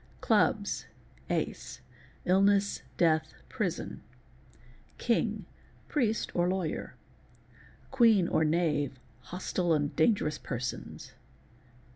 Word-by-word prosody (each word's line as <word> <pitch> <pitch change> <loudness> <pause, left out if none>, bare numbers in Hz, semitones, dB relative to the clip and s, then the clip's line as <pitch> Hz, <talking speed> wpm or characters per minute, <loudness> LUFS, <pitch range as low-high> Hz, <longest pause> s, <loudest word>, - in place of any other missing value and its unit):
CiuBs.—Ace—uillness, 180 - 0 0.2
death, 160 -2 +2
prison. - - -3 1.0
King—priest, 225 +1 -2
or 175 0 +2
lawyer. 185 -4 -3 1.0
Queen 225 -8 +5
or 160 - +2
Knave—hostile 155 +1 -1
and 145 -2 0
dangerous 160 -3 +2
persons. 125 -2 -5
170 Hz, 60 wpm, -30 LUFS, 145-200 Hz, 1.0 s, Queen